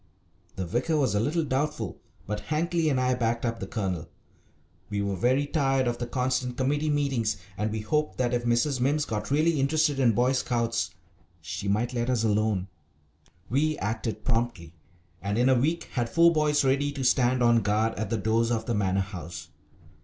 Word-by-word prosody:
The 95 - -3
vicar 125 - 0
was 130 -8 +1
a 105 - +2
little 155 +9 0
doubtful, 145 +2 -2 0.2
but 105 0 -5
Hankly 165 +1 +1
and 135 -3 +1
I 130 0 +2
backed 115 -1 -1
up 115 -1 -2
the 95 - -5
Colonel. 95 -6 -3 0.8
We 105 -1 -2
were 100 -1 -1
very 130 +9 +2
tired 135 -4 +1
of 120 0 -1
the 120 - -3
constant 125 0 -1
committee 145 +3 0
meetings, 135 -8 0 0.2
and 105 +1 -2
we 110 0 -3
hoped 150 +8 -1
that 125 -1 0
if 120 0 0
Mrs. 120 +3 +1
Mimms 145 +4 +1
got 105 -2 -4
really 155 +2 +2
interested 145 +1 +2
in 120 -4 +4
Boy 125 +4 +2
Scouts 120 -3 0 0.5
she 85 +4 -5
might 110 +5 0
let 120 0 -1
us 120 -3 +1
alone. 105 -3 +1 0.8
We 150 +4 +1
acted 110 +2 -3
promptly, 115 -9 -1 0.5
and 100 +2 -2
in 125 +2 +3
a - - +6
week 160 +7 +1
had 120 -2 -1
four 170 +4 +5
boys 150 -2 +2
ready 140 +2 +2
to 140 -2 -4
stand 125 0 +3
on 120 -1 +5
guard 110 +2 +1
at 105 0 -4
the 115 - 0
doors 110 +3 +1
of 115 -2 -1
the 120 - -1
Manor 95 -2 +1
House. 90 -4 -7
120 Hz, 190 wpm, -27 LUFS, 110-140 Hz, 0.8 s, a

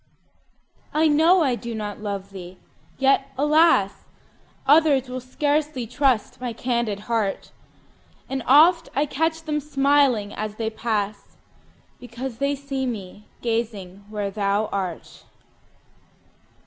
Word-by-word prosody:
I 315 +1 +4
know 325 +4 +5
I 265 -4 +2
do 235 -1 -5
not 210 -2 -5
love 200 -2 -5
thee! 185 -1 -10 0.4
yet, 270 0 +2
alas! 295 - +3 0.6
Others 285 -3 +4
will 255 0 -4
scarcely 290 +1 -1
trust 250 -1 0
my 245 -2 -3
candid 235 -4 -2
heart; 215 -3 -2 0.8
And 270 0 -3
oft 325 +5 +6
I 285 +2 +2
catch 320 +3 -1
them 305 -1 -1
smiling 275 -7 +2
as 215 0 -5
they 220 0 -3
pass, 215 -2 -3 0.6
Because 245 0 -7
they 280 +1 +1
see 275 -1 -4
me 210 -3 -7 0.2
gazing 215 -5 -3
where 205 -2 -3
thou 200 +1 0
art. 185 -4 -5
245 Hz, 120 wpm, -23 LUFS, 210-285 Hz, 0.8 s, oft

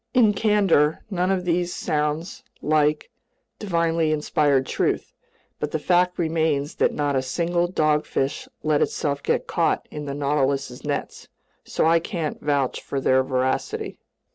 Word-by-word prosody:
In 225 -4 +5
candor, 195 -8 +2
none 180 -1 0
of 185 -2 0
these 175 0 0
sounds 150 +3 -2 0.2
like 150 0 +1 0.5
divinely 170 -5 +1
inspired 145 -3 +2
truth. - - -1 0.5
But 150 - -2
the 160 - -1
fact 180 +3 +2
remains 160 -3 0
that - - +3
not 145 -1 -1
a 130 - +2
single 170 +6 0
dogfish 150 -5 0 0.2
let 155 -1 +2
itself 140 -1 -1
get - - 0
caught - - 0
in 150 -1 -6
the 140 -1 -4
Nautilus's 140 -2 -1
nets, 145 -1 -4 0.4
so - - 0
I 165 +1 +5
can't 165 -2 -4
vouch 140 -3 0
for 140 - -3
their 130 0 +3
voracity. 130 0 -2
150 Hz, 140 wpm, -23 LUFS, 140-170 Hz, 0.5 s, In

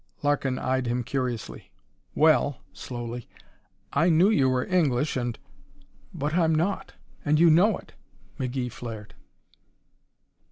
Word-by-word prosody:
Larkin 140 -3 +1
eyed 130 -1 -1
him 120 +1 -1
curiously. 125 -3 -4 0.5
"Well," 150 -3 +3
slowly, 120 -1 -6 0.7
"I 165 +5 +3
knew 175 +6 +5
you 135 -10 +3
were 130 0 0
English 150 -6 +1
and 120 -3 -2 0.4
" - - -27 0.3
"But 150 +2 -2
I'm 165 -2 +3
not, 175 +6 -1 0.3
and 150 0 +2
you 170 -1 +7
know 190 +6 +4
it!" - - -16 0.5
McGee 125 -1 -2
flared. 110 -3 -8
135 Hz, 125 wpm, -26 LUFS, 125-160 Hz, 0.7 s, you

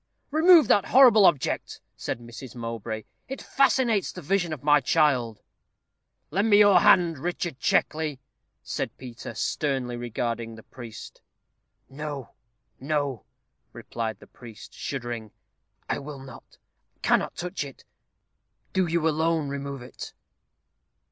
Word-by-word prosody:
"Remove 320 -2 +7
that 200 - +4
horrible 235 -6 +7
object," 150 -7 0 0.2
said - - -4
Mrs. 120 +1 -10
Mowbray; 115 -2 -5 0.2
"it 270 - -6
fascinates 255 -6 +2
the - - -9
vision 180 +1 0
of 150 -4 -6
my 150 0 +5
child." 125 -5 +1 0.9
"Lend 200 +7 +1
me 205 - +7
your 205 -3 +7
hand, 170 -4 +4
Richard 175 -2 -3
Checkley," 155 -3 0 0.4
said - - -4
Peter, 125 -2 -9
sternly 135 -5 -1
regarding 115 -1 -3
the 110 - -13
priest. 115 -4 -11 0.7
"No, 145 -2 -6 0.5
no," 140 -3 -2 0.5
replied 115 -2 -5
the - - -14
priest, 115 -3 -13
shuddering; 120 -5 -5 0.6
"I - - -1
will 145 0 -8
not, 135 0 -13 0.5
cannot - - +2
touch 180 -1 -4
it. 140 -2 -11 0.9
Do 190 -2 +2
you 165 -1 +1
alone 160 -1 +1
remove 140 -2 -5
it." 125 - -9
140 Hz, 120 wpm, -26 LUFS, 120-175 Hz, 0.9 s, Remove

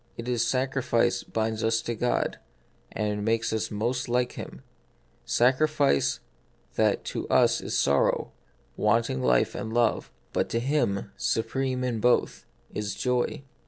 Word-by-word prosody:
It 115 - -6
is 125 -2 +1
sacrifice 130 -2 +1
binds 110 0 -2
us 115 0 +2
to 120 - -2
God, 120 +2 -1 0.5
and 105 -1 -2
makes 115 +1 0
us 110 - -1
most 120 +4 -2
like 125 0 +1
Him: - - -9 0.6
sacrifice 130 - +2 0.5
that - - +2
to - - -4
us - - +4
is - - -2
sorrow, 70 0 +2 0.4
wanting 105 - +1
life 65 -1 +2
and 110 - -5
love; 120 -1 +1 0.2
but - - 0
to 115 - 0
Him, 120 -7 0
supreme 130 +2 -1
in 120 -3 -1
both, 125 +3 +1 0.3
is 100 -2 -3
joy. 125 +3 -1
115 Hz, 135 wpm, -27 LUFS, 105-125 Hz, 0.6 s, us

